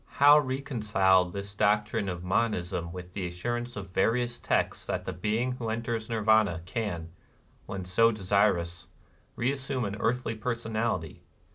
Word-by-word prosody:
How 145 Hz, +2 st, +8 dB
reconcile 110 Hz, -9 st, +2 dB
this 100 Hz, +3 st, -6 dB
doctrine 105 Hz, -1 st, +1 dB
of 90 Hz, -1 st, -5 dB
monism 90 Hz, -3 st, -1 dB
with 90 Hz, 0 st, -9 dB
the 95 Hz, -3 st, -3 dB
assurance 120 Hz, +7 st, -4 dB
of 95 Hz, -3 st, -7 dB
va 95 Hz, -, +3 dB
rious 120 Hz, +1 st, -1 dB
texts -, -, 0 dB
that -, -, -2 dB
the -, -, -3 dB
being 110 Hz, +8 st, 0 dB
who 120 Hz, -3 st, -4 dB
enters 115 Hz, 0 st, -3 dB
Nirvana 110 Hz, -6 st, +3 dB
can, 90 Hz, -6 st, -3 dB, 0.6 s
when 95 Hz, -2 st, -5 dB
so 115 Hz, +6 st, +4 dB
desirous, 95 Hz, -4 st, +1 dB, 0.5 s
reassume 130 Hz, 0 st, -1 dB
an 100 Hz, 0 st, -3 dB
earthly 120 Hz, +1 st, 0 dB
personality? 110 Hz, -, -2 dB
105 Hz, 140 wpm, -28 LUFS, 90-120 Hz, 0.6 s, How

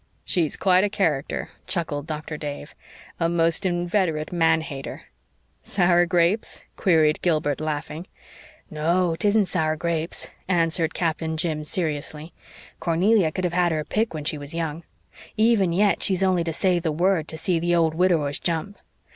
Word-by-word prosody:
"She's 165 Hz, -6 st, 0 dB
quite 185 Hz, 0 st, +4 dB
a 205 Hz, -, +2 dB
character," 160 Hz, -5 st, -1 dB, 0.2 s
chuckled 165 Hz, -6 st, -2 dB
Doctor 155 Hz, 0 st, -5 dB
Dave. 145 Hz, 0 st, -6 dB, 0.5 s
"A 165 Hz, -1 st, +1 dB
most 170 Hz, +2 st, +1 dB
inveterate 175 Hz, -3 st, 0 dB
man 160 Hz, -2 st, +3 dB
hater!" 140 Hz, -4 st, -7 dB, 0.6 s
"Sour 175 Hz, -2 st, +2 dB
grapes?" 175 Hz, +5 st, +1 dB
queried 160 Hz, -5 st, +3 dB
Gilbert, 155 Hz, -4 st, 0 dB
laughing. 155 Hz, +3 st, -4 dB, 0.6 s
"No, 165 Hz, +3 st, +1 dB
'tisn't 210 Hz, 0 st, +3 dB
sour 155 Hz, -3 st, 0 dB
grapes," 165 Hz, 0 st, -1 dB, 0.2 s
answered 165 Hz, -2 st, +1 dB
Captain 160 Hz, -1 st, -1 dB
Jim 155 Hz, -2 st, -1 dB
seriously. 155 Hz, -1 st, -3 dB, 0.5 s
"Cornelia 180 Hz, +1 st, +2 dB
could 185 Hz, +3 st, -4 dB
have 175 Hz, -1 st, -1 dB
had 175 Hz, -1 st, +2 dB
her 155 Hz, -1 st, -1 dB
pick 220 Hz, +6 st, 0 dB
when 155 Hz, -2 st, -5 dB
she 150 Hz, 0 st, -1 dB
was 145 Hz, +3 st, -7 dB
young. 165 Hz, -1 st, -3 dB, 0.6 s
Even 215 Hz, -5 st, +3 dB
yet 200 Hz, +4 st, +2 dB
she's 190 Hz, -1 st, +1 dB
only 185 Hz, -2 st, +2 dB
to 165 Hz, -, -1 dB
say 180 Hz, +2 st, +1 dB
the 165 Hz, -2 st, -1 dB
word 170 Hz, 0 st, +1 dB
to 160 Hz, -, -6 dB
see 170 Hz, +1 st, 0 dB
the 175 Hz, +1 st, +1 dB
old 165 Hz, -2 st, +2 dB
widowers 160 Hz, -5 st, +1 dB
jump. 175 Hz, +5 st, -3 dB
165 Hz, 155 wpm, -24 LUFS, 155-180 Hz, 0.6 s, quite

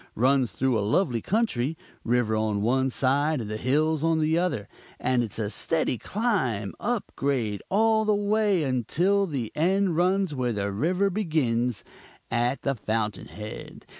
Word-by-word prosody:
Runs 130 Hz, -1 st, +2 dB
through 125 Hz, +1 st, +1 dB
a -, -, 0 dB
lovely 115 Hz, -, +1 dB
country 165 Hz, -, 0 dB, 0.3 s
river 120 Hz, -2 st, +1 dB
on 110 Hz, -2 st, 0 dB
one 130 Hz, +3 st, +2 dB
side 140 Hz, +4 st, +1 dB
and 110 Hz, -, -4 dB
the 110 Hz, -, -2 dB
hills 155 Hz, +6 st, +1 dB
on 165 Hz, -1 st, +2 dB
the 155 Hz, +1 st, +2 dB
other; 170 Hz, -, -1 dB, 0.3 s
and 125 Hz, 0 st, +1 dB
it's 115 Hz, -4 st, -4 dB
a 105 Hz, -2 st, -2 dB
steady 155 Hz, -6 st, 0 dB
climb, 155 Hz, -, -1 dB
up 235 Hz, -1 st, -2 dB
grade 120 Hz, -8 st, -1 dB
all 220 Hz, +2 st, +3 dB
the 215 Hz, -1 st, +2 dB
way 205 Hz, -3 st, +2 dB
until 170 Hz, -, +1 dB
the 130 Hz, -9 st, -3 dB
run 180 Hz, +1 st, +2 dB
ends 195 Hz, -5 st, -1 dB
where 125 Hz, -3 st, -1 dB
the 100 Hz, -1 st, -2 dB
river 180 Hz, -, +1 dB
begins, 125 Hz, -, 0 dB, 0.5 s
at 120 Hz, +3 st, 0 dB
the 140 Hz, -, +1 dB
fountain 110 Hz, -3 st, -2 dB
head. 105 Hz, +1 st, -9 dB
135 Hz, 160 wpm, -26 LUFS, 115-180 Hz, 0.5 s, all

